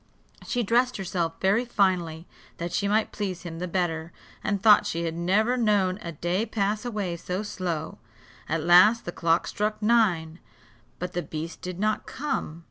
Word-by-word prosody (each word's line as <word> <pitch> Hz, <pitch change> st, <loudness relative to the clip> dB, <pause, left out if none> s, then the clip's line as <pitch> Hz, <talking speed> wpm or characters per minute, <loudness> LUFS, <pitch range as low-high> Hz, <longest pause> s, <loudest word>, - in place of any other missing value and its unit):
She 245 Hz, -2 st, 0 dB
dressed 245 Hz, +4 st, +2 dB
herself 175 Hz, -4 st, -2 dB
very 200 Hz, +5 st, +3 dB
finely, 180 Hz, -8 st, 0 dB, 0.3 s
that 170 Hz, +1 st, -4 dB
she 200 Hz, -, 0 dB
might 215 Hz, +2 st, +1 dB
please 190 Hz, -4 st, -4 dB
him 165 Hz, -2 st, -7 dB
the 180 Hz, -, -3 dB
better, 170 Hz, -2 st, -2 dB, 0.3 s
and 200 Hz, -1 st, 0 dB
thought 210 Hz, 0 st, +6 dB
she 170 Hz, +1 st, -2 dB
had 165 Hz, -1 st, -2 dB
never 200 Hz, +9 st, +1 dB
known 205 Hz, -5 st, +2 dB
a 170 Hz, -, -5 dB
day 175 Hz, +6 st, -1 dB
pass 210 Hz, -1 st, -1 dB
away 210 Hz, -7 st, -3 dB
so 180 Hz, +4 st, -3 dB
slow. 180 Hz, -6 st, -4 dB, 0.5 s
At 160 Hz, 0 st, 0 dB
last 185 Hz, +7 st, +6 dB
the 175 Hz, -, -3 dB
clock 165 Hz, 0 st, +1 dB
struck 210 Hz, +1 st, -2 dB
nine, 190 Hz, -8 st, +2 dB, 0.6 s
but 180 Hz, 0 st, -5 dB
the 175 Hz, -, -1 dB
beast 160 Hz, +1 st, -6 dB
did 180 Hz, 0 st, -6 dB
not 215 Hz, +1 st, 0 dB
come. 255 Hz, -, -3 dB
185 Hz, 170 wpm, -26 LUFS, 170-215 Hz, 0.6 s, thought